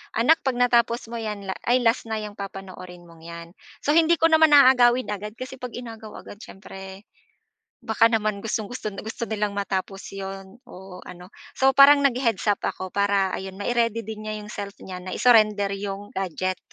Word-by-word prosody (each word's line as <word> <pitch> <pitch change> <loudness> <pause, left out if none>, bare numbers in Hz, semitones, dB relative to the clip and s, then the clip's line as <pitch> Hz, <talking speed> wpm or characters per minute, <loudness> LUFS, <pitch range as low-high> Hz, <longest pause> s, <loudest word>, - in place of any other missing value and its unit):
"Anak 270 +9 +4
'pag 260 -2 0
natapos 235 -1 +2
mo 235 - -4
'yan, 210 -3 -5 0.2
ay 250 +1 +3
last 230 +1 +2
na 220 - -1
'yang 210 -1 -8
papanoorin 185 -3 -9
mong 165 -1 -17
'yan." 170 0 -9 0.4
So 295 - +3
hindi 335 0 +5
ko 330 - +5
naman 315 -1 +5
aagawin 255 -3 +5
agad, 210 +1 -5
kasi 260 +1 -7
'pag 250 -1 -6
inagaw 225 -3 -9
agad 205 - -12
siyempre 195 0 -11 0.8
baka 225 0 +3
naman 215 -2 -1
gustong-gusto 215 0 -4
gusto 220 +2 -6
nilang 210 -2 -2
matapos 195 0 -4
'yon 195 +2 -8
o 190 -3 -11
ano. 180 +2 -12 0.3
So 265 0 +5
parang 280 +1 +7
nag-he-heads-up 235 -6 +1
ako 185 -1 -4
para 200 -1 +1
ayun, 190 0 -7
ma-i-ready 230 +1 0
din 215 0 -8
niya 215 - -3
yung 210 - -10
self 200 -1 -7
niya 185 -1 -7
na 185 - -7
i-surrender 215 -4 +4
'yong 200 +1 -6
gadget. 185 0 -3
210 Hz, 170 wpm, -24 LUFS, 195-240 Hz, 0.8 s, parang